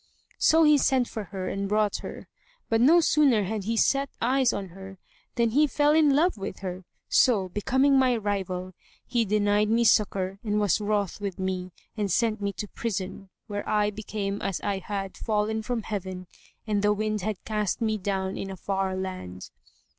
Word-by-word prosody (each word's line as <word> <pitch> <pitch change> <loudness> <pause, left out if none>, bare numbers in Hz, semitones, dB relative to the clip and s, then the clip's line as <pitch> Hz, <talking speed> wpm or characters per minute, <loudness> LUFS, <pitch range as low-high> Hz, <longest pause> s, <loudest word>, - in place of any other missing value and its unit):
So 325 +1 +5
he 300 -2 +6
sent 255 -2 +2
for 215 -2 -6
her 185 0 -5
and 195 0 -3
brought 210 0 +1
her; - - -9 0.4
but 225 0 +2
no 325 +7 +6
sooner 280 -9 +3
had 205 0 -3
he 230 +1 -1
set 275 +4 +2
eyes 255 +1 +2
on 195 -2 -4
her 195 +2 -11 0.4
than 235 -2 +2
he 295 +5 +4
fell 290 +3 +2
in 300 -3 +4
love 320 - +2
with 195 - -6
her; 185 -1 -5 0.2
so, 205 -7 +3
becoming 265 +8 +2
my 255 -2 +3
rival, 185 -3 -3 0.3
he 235 -2 0
denied 210 0 +2
me 230 +2 +3
succour 195 -3 +2
and 210 -2 0
was 205 0 +2
wroth 205 -2 -1
with 200 -3 -4
me, 185 -1 -3 0.3
and 205 -3 -1
sent 220 +2 +1
me 200 0 -1
to 210 - -5
prison, 195 -3 -4 0.2
where 205 -1 -5
I 210 0 +2
became 205 -1 -4
as 195 -3 -2
I 200 -1 -1
had 195 0 -5
fallen 220 0 -1
from 230 0 -3
heaven 190 -3 -5 0.4
and 210 -2 0
the 210 0 +3
wind 215 0 -2
had 205 0 -4
cast 210 -3 -1
me 220 -2 0
down 190 0 -2
in 195 - -4
a 190 - -7
far 190 0 -2
land. 185 - -6
210 Hz, 185 wpm, -26 LUFS, 195-230 Hz, 0.4 s, he